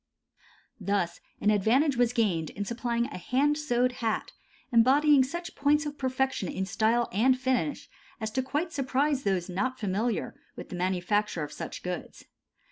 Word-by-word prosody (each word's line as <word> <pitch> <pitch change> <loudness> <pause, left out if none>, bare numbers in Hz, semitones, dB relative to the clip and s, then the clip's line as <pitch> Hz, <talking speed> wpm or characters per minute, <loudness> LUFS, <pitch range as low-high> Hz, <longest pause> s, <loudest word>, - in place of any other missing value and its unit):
Thus 195 -3 -1 0.2
an 210 - +4
advantage 245 +8 +3
was 240 -1 +3
gained 195 - 0
in 205 - -5
supplying 235 +1 -1
a 235 - -7
hand 275 +10 +2
sewed 255 -4 +1
hat, 225 -2 -1 0.4
embodying 270 +4 +5
such 340 +6 -5
points 295 +2 +2
of 295 0 -6
perfection 260 -7 -1
in 190 - -2
style 225 +5 +1
and 255 +6 +3
finish 260 +3 -1 0.3
as 220 -1 -3
to 260 - 0
quite 295 +6 -2
surprise 275 +1 +1
those 190 -6 0
not 255 +8 -2
familiar 210 +2 -1 0.2
with - - -9
the - - -6
manufacture 185 0 0
of 145 - -6
such - - -7
goods. 180 -2 -6
240 Hz, 155 wpm, -28 LUFS, 200-270 Hz, 0.4 s, embodying